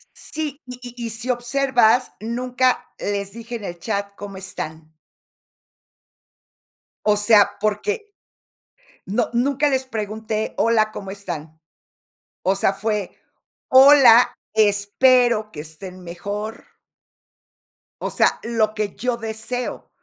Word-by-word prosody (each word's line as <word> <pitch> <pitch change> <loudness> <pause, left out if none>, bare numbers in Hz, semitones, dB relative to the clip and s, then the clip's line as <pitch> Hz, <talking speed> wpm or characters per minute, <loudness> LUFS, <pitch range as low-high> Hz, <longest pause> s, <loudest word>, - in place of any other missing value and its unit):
Sí, 300 -2 -4
y 250 -1 -8
y 245 -1 -7
y - - -4
si 235 +3 -4
observas, 245 -1 +2
nunca 250 +3 0
les 200 -1 -3
dije 230 +2 -8
en 220 - -8
el 175 -2 -6
chat: 200 +1 -3
"¿Cómo 200 -1 -8
están?" 160 -4 -7 2.1
O 210 -1 +4
sea, 205 -1 +5
porque, 410 - -2 0.9
no, 220 +5 0
nunca 275 +4 +2
les 265 -2 0
pregunté: 220 -2 -4
"Hola, 220 -2 +2
¿cómo 195 -2 -7
están?", 160 -6 -7 0.8
o 190 +1 +2
sea, 195 0 +2
fue: 210 -1 -2 0.6
"Hola, 260 -3 +8 0.2
espero 215 +2 +3
que 150 - -7
estén 180 +4 -10
mejor". 205 +6 -6 1.4
O - - -3
sea, - - +2
lo 220 -2 0
que 210 -2 -3
yo 250 -1 -1
deseo. 225 +2 -5
220 Hz, 115 wpm, -22 LUFS, 200-245 Hz, 2.1 s, Hola